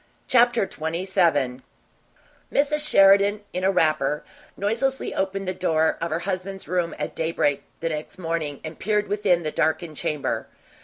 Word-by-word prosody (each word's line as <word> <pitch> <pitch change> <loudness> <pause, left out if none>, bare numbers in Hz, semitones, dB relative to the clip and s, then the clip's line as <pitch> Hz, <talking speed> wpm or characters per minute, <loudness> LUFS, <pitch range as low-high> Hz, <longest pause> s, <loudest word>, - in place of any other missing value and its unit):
CHAPTER 240 -2 +4
XXVII 165 -6 0 0.9
Mrs. 300 +1 +2
Sheridan, 200 +1 +5
in 180 - -2
a 190 - +4
wrapper, 155 -5 +1 0.3
noiselessly 235 +7 -1
opened 195 0 -2
the 185 - 0
door 160 -3 +1
of 170 - -1
her 160 +2 -2
husband's 195 0 -4
room 175 -2 -1
at - - -4
daybreak 160 -3 0 0.2
the 165 - 0
next 155 +3 -5
morning, 165 -5 -3
and 160 0 -8
peered 210 0 0
within 195 -4 +1
the 155 - -2
darkened 160 0 0
chamber. 150 0 -2
180 Hz, 145 wpm, -24 LUFS, 160-200 Hz, 0.9 s, Sheridan